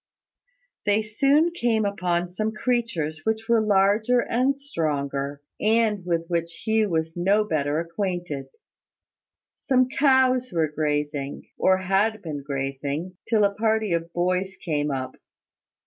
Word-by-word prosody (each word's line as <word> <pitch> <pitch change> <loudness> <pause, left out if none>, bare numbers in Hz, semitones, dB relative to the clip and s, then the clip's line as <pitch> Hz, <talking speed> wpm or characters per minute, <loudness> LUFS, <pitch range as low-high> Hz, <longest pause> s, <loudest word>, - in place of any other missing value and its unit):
They 205 +1 +3
soon 275 +10 +3
came 235 -9 +1
upon 180 -3 -1
some 215 +4 -2
creatures 215 -10 -1
which 220 0 -1
were 235 -2 +4
larger 210 +4 +3
and 255 +4 +1
stronger, 145 - -3 0.2
and 215 -2 +2
with 170 -2 -1
which 170 -1 -3
Hugh 220 -1 +2
was 160 -1 -1
no 195 +5 +3
better 150 -5 0
acquainted. 170 -5 -3 1.1
Some 255 -2 +2
cows 260 -2 +3
were 165 -3 +1
grazing, 145 -2 -2
or 190 0 +3
had 195 +3 0
been 150 -4 -5
grazing, 140 +5 -4
till 220 -2 +3
a 200 0 +3
party 220 -2 +1
of 170 0 -2
boys 185 +2 -1
came 150 -4 -1
up. 130 -2 -4
190 Hz, 130 wpm, -24 LUFS, 160-220 Hz, 1.1 s, were